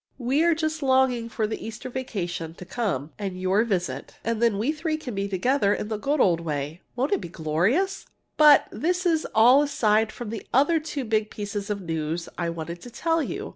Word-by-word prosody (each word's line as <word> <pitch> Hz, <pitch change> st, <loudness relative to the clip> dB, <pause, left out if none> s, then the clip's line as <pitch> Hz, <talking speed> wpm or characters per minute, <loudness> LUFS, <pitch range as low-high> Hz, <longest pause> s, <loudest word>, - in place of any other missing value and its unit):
We 265 Hz, +5 st, +1 dB
are 340 Hz, -1 st, +4 dB
just 315 Hz, 0 st, -2 dB
longing 260 Hz, -3 st, +2 dB
for 220 Hz, -1 st, -1 dB
the 220 Hz, -, -4 dB
Easter 225 Hz, +2 st, -7 dB
vacation 180 Hz, -10 st, -4 dB
to 180 Hz, -, -10 dB
come, 175 Hz, -, -2 dB
and 190 Hz, -3 st, -4 dB
your 190 Hz, +4 st, +2 dB
visit. 190 Hz, -6 st, -3 dB
Then 230 Hz, -2 st, +1 dB
we 230 Hz, +8 st, +1 dB
three 315 Hz, 0 st, -2 dB
can 255 Hz, -6 st, -6 dB
be 200 Hz, 0 st, -2 dB
together 200 Hz, +2 st, +2 dB
again -, -, -3 dB
in -, -, -7 dB
the 215 Hz, -, -2 dB
good 280 Hz, +7 st, 0 dB
old 175 Hz, -8 st, +4 dB
way. 150 Hz, 0 st, -4 dB
Won't 260 Hz, +4 st, 0 dB
it 395 Hz, -, 0 dB
be -, -, -7 dB
glorious? 190 Hz, -, 0 dB, 0.3 s
But 300 Hz, -2 st, +7 dB
this 360 Hz, +3 st, -1 dB
is 325 Hz, -3 st, +2 dB
all 245 Hz, +6 st, +7 dB
aside 220 Hz, -6 st, +2 dB
from 230 Hz, -2 st, -7 dB
the 225 Hz, -, -5 dB
other 290 Hz, +6 st, +4 dB
two 300 Hz, -4 st, -4 dB
big 215 Hz, -1 st, 0 dB
pieces 205 Hz, -1 st, -5 dB
of 205 Hz, -1 st, -2 dB
news 165 Hz, 0 st, -3 dB
I 170 Hz, -1 st, -2 dB
wanted 170 Hz, +1 st, -6 dB
to 245 Hz, -, -9 dB
tell 325 Hz, +6 st, 0 dB
you. -, -, -4 dB
220 Hz, 210 wpm, -25 LUFS, 185-280 Hz, 0.3 s, But